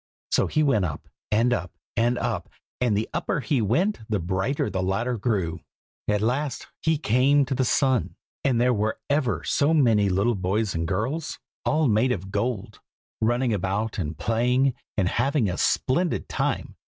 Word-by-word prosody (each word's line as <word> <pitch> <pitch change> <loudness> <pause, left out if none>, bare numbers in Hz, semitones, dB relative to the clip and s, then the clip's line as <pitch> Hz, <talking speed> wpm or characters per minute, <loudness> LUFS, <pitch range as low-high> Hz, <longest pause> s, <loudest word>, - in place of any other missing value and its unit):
So - - +3
he 155 - +1
went 135 -9 +3
up, 80 -5 -4 0.2
and 115 +3 +3
up, 90 -5 -3 0.2
and 120 +2 +2
up, 110 -9 -2 0.3
and 120 -5 +2
the 110 - -1
upper 170 -2 -1
he 135 -3 0
went 180 - +1
the 105 - +1
brighter 95 - -1
the 95 0 -2
ladder 115 +7 0
grew. 100 -7 -1 0.5
At 105 -1 +1
last 130 +4 -1 0.2
he 160 -1 +2
came 140 +2 +3
to 130 - -2
the 130 - +1
sun, 130 -1 +1 0.3
and 130 -4 +2
there 125 +1 +3
were 110 0 -1
ever 120 - +1
so 150 - +2
many 110 -9 +4
little 100 +6 +2
boys 100 +1 -1
and 80 0 -2
girls, 125 - -2 0.3
all 155 0 +2
made 115 +3 +3
of 95 -4 -3
gold, 115 -1 -2 0.4
running 120 +2 +2
about 100 +3 -1
and 80 -3 -3
playing, 125 - +2 0.2
and 95 -4 +2
having 125 - +1
a 90 - -1
splendid 165 - +1
time. - - -2
115 Hz, 170 wpm, -25 LUFS, 100-130 Hz, 0.5 s, many